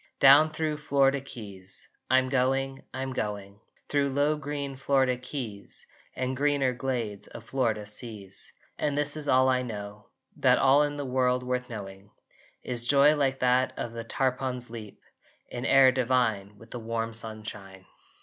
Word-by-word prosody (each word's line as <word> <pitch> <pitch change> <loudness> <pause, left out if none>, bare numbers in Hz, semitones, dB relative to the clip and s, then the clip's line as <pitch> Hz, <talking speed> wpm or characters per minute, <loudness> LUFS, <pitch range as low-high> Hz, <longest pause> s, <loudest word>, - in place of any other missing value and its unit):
Down 145 +3 +8
thro 155 -1 -2
Florida 140 -2 +2
keys 100 -8 -9 0.2
I'm 130 0 +4
going, 135 +1 0
I'm 130 0 -4
going! 100 -3 -4 0.3
Thro 145 -1 +1
low 145 +3 +1
green 145 -2 -4
Florida 130 -1 +2
keys 125 -5 -7 0.3
And 130 0 -2
greener 140 -2 +1
glades 120 -6 -3
of 115 - -10
Florida 115 -4 -1
seas! 105 -2 -7 0.3
And 145 -1 0
this 145 0 +2
is 150 -1 -4
all 130 0 +5
I 130 -1 +3
know, 105 -3 -7 0.3
That - - +4
all 135 +2 +5
in 145 0 0
the 145 - -3
world 125 -1 +1
worth 125 0 -2
knowing 100 -3 -8 0.5
Is 120 -2 -3
joy 140 +4 +5
like 135 -2 +1
that 125 +1 +3
of 115 - -4
the 115 0 -5
tarpon's 125 0 -2
leap 110 -3 -9 0.5
In 120 +2 -4
air 135 -1 +7
divine 120 -6 0
with 115 +2 -16
the 120 - -5
warm 115 0 -3
sunshine! 105 -4 -7
125 Hz, 155 wpm, -28 LUFS, 110-135 Hz, 0.5 s, Down